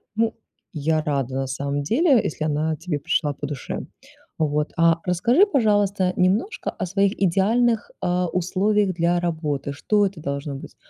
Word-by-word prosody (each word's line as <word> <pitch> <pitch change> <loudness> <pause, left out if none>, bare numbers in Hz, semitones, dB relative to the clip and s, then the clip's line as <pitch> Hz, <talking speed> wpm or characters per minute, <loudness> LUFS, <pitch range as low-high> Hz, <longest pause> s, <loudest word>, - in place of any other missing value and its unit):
Ну, 225 0 +1 0.4
я 155 0 0
рада, 135 -4 -2
на 135 0 -1
самом 140 +2 -2
деле, 260 - +3
если 155 - -3
она 155 +1 0
тебе 160 -1 -4
пришла 150 -1 0
по 145 - -6
душе. 145 -2 -5 0.5
Вот, 150 -1 0
а 165 -1 +3
расскажи, 235 - +4
пожалуйста, 205 - +2
немножко 195 - 0
о - - -4
своих 195 +2 +1
идеальных, 215 +5 +2
а, 180 0 0
условиях 190 +3 +1
для 170 +1 +1
работы. 155 -5 -2
Что 205 +8 +1
это 195 -3 -4
должно 140 -1 -4
быть? 135 - -10
175 Hz, 155 wpm, -23 LUFS, 150-205 Hz, 0.5 s, расскажи